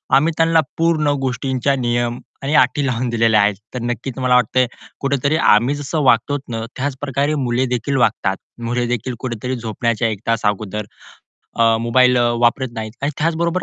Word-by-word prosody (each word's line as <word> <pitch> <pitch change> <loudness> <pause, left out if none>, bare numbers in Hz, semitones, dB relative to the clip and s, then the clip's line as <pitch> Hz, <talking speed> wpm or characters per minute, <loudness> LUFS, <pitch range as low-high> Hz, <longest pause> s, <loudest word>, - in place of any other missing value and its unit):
आम्ही 155 +5 +3
त्यांना 165 0 +4 0.2
पूर्ण 165 -2 +2
गोष्टींचा 130 +1 0
नियम 120 -1 -1 0.2
आणि 140 +2 -1
अटी 130 +2 +3
लावून 125 0 -1
दिलेले 115 -2 +3
आहेत. 100 -1 +3 0.2
तर 125 - -3
नक्कीच 120 +2 -4
तुम्हाला 125 -1 +2
वाटतंय 125 +1 +3 0.3
कुठेतरी 140 +2 0
आम्ही 120 +1 +4
जसं 145 +2 -2
वागतो 130 +3 +3
ना, 115 -1 -3
त्याच 135 +1 -2
प्रकारे 140 +2 0
मुले 120 +2 +1
देखील 125 +4 -1
वागतात. 105 -5 +1 0.3
मुले 120 0 0
देखील 125 +1 -2
कुठेतरी 125 0 -4
झोपण्याच्या 115 0 -1
1 110 -3 -3
तास 115 -1 0
अगोदर, 105 0 -1 0.7
अ, 115 -1 +4
मोबाईल 125 +2 +4 0.2
वापरत 125 +2 +2
नाहीत 110 -2 -5
आणि 140 - +1
त्याचबरोबर 170 +3 0
125 Hz, 165 wpm, -19 LUFS, 115-140 Hz, 0.7 s, त्यांना